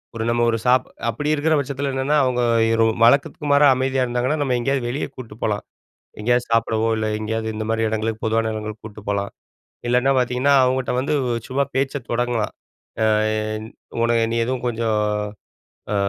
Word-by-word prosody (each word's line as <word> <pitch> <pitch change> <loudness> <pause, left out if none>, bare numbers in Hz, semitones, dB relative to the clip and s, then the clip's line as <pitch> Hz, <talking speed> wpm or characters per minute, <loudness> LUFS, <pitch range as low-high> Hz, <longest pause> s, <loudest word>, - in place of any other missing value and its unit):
ஒரு 110 - -2
நம்ம 120 0 +2
ஒரு 115 - 0
சாப் 125 +1 +3 0.2
அப்படி 145 +7 -2
இருக்கிற 155 +1 +1
பட்சத்தில. 140 0 -2
என்னான்னா, 135 +3 +1
அவுங்க 125 -1 +1 0.3
இரு 115 0 +3 0.2
வழக்கத்துக்கு 140 +4 +3
மாறா 145 +1 +6
அமைதியா 130 0 0
இருந்தாங்கன்னா, 125 +4 0
நம்ம 130 -3 +1
எங்கேயாவது 130 0 0
வெளிய 135 +5 -2
கூட்ட்டு 115 -4 -9
போலாம். 105 -1 -1 0.6
எங்கேயாச்சு 120 +2 +1
சாப்பிடவோ 115 -1 +1
இல்ல, 110 0 -1
எங்கேயாது 110 +1 -3
இந்த 110 0 -3
மாரி 115 0 +1
எடங்களுக்கு 110 0 -2
பொதுவான 110 0 +1
எடங்களுக்கு 110 0 -6
கூட்ட்டு 110 -1 -10
போலாம். 100 0 -1 0.6
இல்லன்னா 125 +3 +3
பாத்தீங்கன்னா, 125 +2 +2
அவுங்கட்ட 130 0 0
வந்து 135 - -2 0.2
உ - - -1 0.2
சும்மா 140 +2 +1
பேச்ச 135 +1 0
தொடங்கலாம். 120 -2 -1 0.5
ஆ, - - +4 0.3
என் 110 0 -3 0.3
உன 115 0 +2 0.2
நீ - - 0
எதுவும் 125 +1 -3
கொஞ்சம் 115 -2 0 1.0
ஆ, - - +1
120 Hz, 170 wpm, -21 LUFS, 110-130 Hz, 1.0 s, மாறா